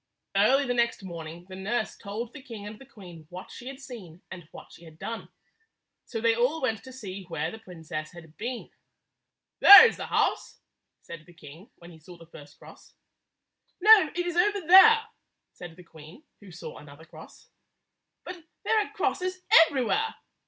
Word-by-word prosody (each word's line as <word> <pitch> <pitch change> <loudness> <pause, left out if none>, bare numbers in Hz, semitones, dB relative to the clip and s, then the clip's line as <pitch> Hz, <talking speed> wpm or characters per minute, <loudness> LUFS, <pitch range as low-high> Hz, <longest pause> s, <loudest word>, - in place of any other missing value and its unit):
Early 260 +8 +3
the 245 - -1
next 235 -4 -1
morning 170 -1 -9
the 190 - -10
nurse 215 +4 -3
told 225 +4 -7
the 295 - -11
king 230 -6 -10
and 210 +1 -10
the 270 - -16
queen 175 - -14
what 180 +1 -11
she 250 - -11
had 270 0 -9
seen 215 - -12
and 175 -4 -11
what - - -14
she - - -16
had 160 -2 -15
done. 230 +6 -7 0.8
So 225 - -6
they 230 0 +2
all 250 +7 0
went 225 -7 -3
to 260 - -11
see 200 -7 -9
where 165 -1 -4
the 220 - -11
princess 160 -5 -8
had 165 -3 -15
been. 240 +2 -7 0.9
"There 405 +3 +10
is - - -5
the - - -7
house," - - -1 0.5
said 155 -2 -12
the 175 - -18
king 160 +5 -15
when 170 0 -15
he 160 - -16
saw 175 +3 -15
the 165 - -16
first 145 -3 -16
cross. - - -17 0.8
"No; 420 -3 +6
it 355 0 -2
is 350 -1 -4
over 405 +3 +1
there," 440 +6 +7 0.5
said 175 -2 -11
the 180 - -15
queen, 160 - -16 0.2
who 200 -3 -15
saw 175 - -10
another 145 +2 -15
cross. - - -16 0.7
"But 360 -2 -10 0.2
there 445 - +1
are - - -12
crosses 370 -2 -3 0.2
everywhere!" 305 - -2
205 Hz, 180 wpm, -26 LUFS, 170-270 Hz, 0.9 s, There